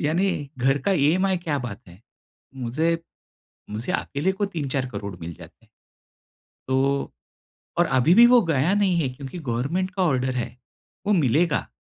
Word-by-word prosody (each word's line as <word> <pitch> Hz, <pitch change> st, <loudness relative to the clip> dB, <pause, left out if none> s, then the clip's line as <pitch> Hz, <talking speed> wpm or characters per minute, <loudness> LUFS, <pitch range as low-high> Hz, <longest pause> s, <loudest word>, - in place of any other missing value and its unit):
यानी 175 Hz, +6 st, +1 dB, 0.3 s
घर 135 Hz, +3 st, +2 dB
का 200 Hz, -, +2 dB
ईएमआई 185 Hz, +5 st, +2 dB
क्या 155 Hz, -5 st, -2 dB
बात 120 Hz, -6 st, -6 dB
है? 90 Hz, +2 st, -15 dB, 0.5 s
मुझे, 155 Hz, +7 st, 0 dB, 0.7 s
मुझे 115 Hz, +12 st, -3 dB
अकेले 165 Hz, +5 st, -1 dB
को 200 Hz, +1 st, -1 dB
3-4 135 Hz, -4 st, -1 dB
करोड़ 100 Hz, -2 st, -5 dB
मिल 85 Hz, 0 st, -6 dB
जाते। 85 Hz, +6 st, -15 dB, 1.0 s
तो 135 Hz, +1 st, +1 dB, 0.7 s
और 175 Hz, -, +4 dB
अभी 135 Hz, +6 st, +3 dB
भी 235 Hz, +2 st, +9 dB
वो 245 Hz, 0 st, +7 dB
गया 150 Hz, +8 st, +2 dB
नहीं 195 Hz, -4 st, +2 dB
है। 135 Hz, -, 0 dB
क्योंकि 135 Hz, +5 st, -8 dB
गवर्नमेंट 150 Hz, +7 st, -2 dB
का 190 Hz, -, 0 dB
ऑर्डर 130 Hz, -5 st, +1 dB
है, 120 Hz, 0 st, -4 dB, 0.5 s
वो 210 Hz, -, +3 dB
मिलेगा। 155 Hz, -, +2 dB
140 Hz, 150 wpm, -24 LUFS, 125-180 Hz, 1.0 s, भी